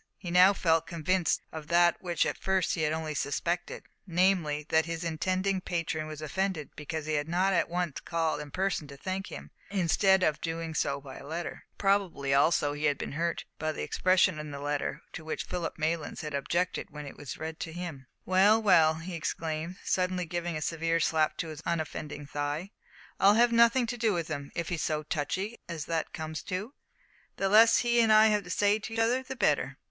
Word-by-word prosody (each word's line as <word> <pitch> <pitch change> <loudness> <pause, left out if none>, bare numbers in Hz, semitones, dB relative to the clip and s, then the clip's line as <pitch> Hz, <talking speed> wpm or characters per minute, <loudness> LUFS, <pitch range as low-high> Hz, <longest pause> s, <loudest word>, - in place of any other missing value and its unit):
He 175 -3 -6
now 180 +2 +7
felt 165 -3 +2
convinced 170 +1 0
of 155 -2 -7
that 170 0 +4
which 175 -2 0
at - - -3
first 190 -2 +1
he 165 - -2
had 155 -1 +1
only 160 -1 -2
suspected 170 +5 -2 0.2
namely, 170 -4 +2
that 160 0 +3
his 165 0 -4
intending 185 +4 0
patron 165 -3 -2
was 155 0 -7
offended 185 -1 -2
because 155 +1 -5
he 155 - -2
had 145 0 0
not 185 +3 +2
at - - +1
once 175 -3 -2
called 165 -3 -1
in 150 - -8
person 185 -2 -1
to 140 -1 -11
thank 190 +5 -4
him, - - -9 0.2
instead 190 0 +3
of 155 -4 +1
doing 165 0 -3
so 140 -2 0
by 135 -1 -10
letter. 160 +5 -6
Probably, 195 -9 +1
also, 145 +1 +3
he 150 +1 -3
had 145 -2 +2
been - - -5
hurt 170 +4 -2
by 155 0 -1
the - - -5
expressions 185 -2 +2
in 150 0 -6
the 140 -1 -6
letter 145 0 -2
to 160 - -7
which 160 - -3
Philip 175 -2 -4
Maylands 160 0 -2
had 150 -1 -5
objected 170 +6 -1
when 150 -1 -8
it 140 - -9
was 145 - -7
read 160 +1 -6
to 165 - -5
him. 160 -6 -7 0.2
"Well, 195 +4 +5
well," 165 -7 +5
he 165 +3 -7
exclaimed, 160 +1 -3
suddenly 185 -1 0
giving 175 0 -3
a 155 - -3
severe 165 +1 0
slap 155 -1 +1
to 165 - -3
his 155 -1 -8
unoffending 155 -3 -3
thigh, 145 +6 -3 0.5
"I'll 200 +2 +6
have 240 +1 +5
nothing 235 +2 +5
to 245 +1 -4
do 220 -2 +2
with 170 -2 -2
him. 145 -2 -5
If 170 -2 -2
he's 170 -3 -2
so 155 -1 -1
touchy 185 +9 -3
as 160 -3 -4
that 165 -1 -2
comes 160 -1 -5
to, 205 +7 -4 0.6
the 195 - 0
less 225 +3 +6
that - - -3
he 235 0 +4
and 225 -1 +4
I 215 0 +7
have 210 -1 +1
to - - -10
say 205 +4 +2
to 225 +2 -7
each - - -4
other 235 +3 +2
the 260 0 -7
better." - - +1
165 Hz, 210 wpm, -29 LUFS, 155-190 Hz, 0.6 s, now